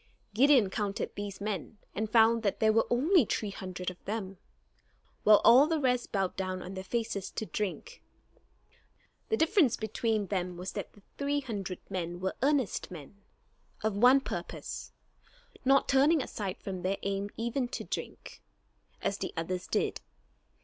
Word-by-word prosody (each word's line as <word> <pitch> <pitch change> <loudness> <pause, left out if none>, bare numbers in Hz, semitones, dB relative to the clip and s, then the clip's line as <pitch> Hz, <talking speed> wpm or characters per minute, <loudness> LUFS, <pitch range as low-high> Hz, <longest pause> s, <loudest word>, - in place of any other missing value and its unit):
Gideon 250 -3 +5
counted 205 -2 -2
these 205 -1 -6
men, 205 0 -4 0.2
and 215 +1 -2
found 225 +1 +5
that 200 -3 -1
there 220 0 +4
were 225 - +3
only 305 +7 +4
three 210 -2 -2
hundred 185 -1 -5
of 180 - -17
them, 195 -3 -4 0.8
while 210 -1 +7
all 255 +6 +8
the 325 -1 +1
rest 250 -3 0
bowed 195 -3 0
down 185 -1 -3
on 185 - -7
their 190 0 -5
faces 200 -2 -2
to 220 - -4
drink. 215 - -4 1.3
The 445 - +2
difference 320 - +3
between 220 0 -1
them 180 -2 -2
was 180 +2 -5
that - - -6
the 205 - -20 0.2
three 285 +1 0
hundred 200 -8 -5 0.4
were 190 +1 -1
earnest 275 -4 +1
men, 180 +4 -11 0.6
of 215 -2 0
one 250 +6 +6
purpose; - - -6 0.7
not 270 +1 +4
turning 280 +2 +4
aside 200 -5 -4
from 185 -2 -6
their 190 +2 0
aim 200 +1 -2
even 235 +3 -1
to - - -5
drink, - - -6 0.6
as 200 - -1
the - - -3
others 180 +2 -3
did. - - -1
215 Hz, 155 wpm, -30 LUFS, 190-250 Hz, 1.3 s, all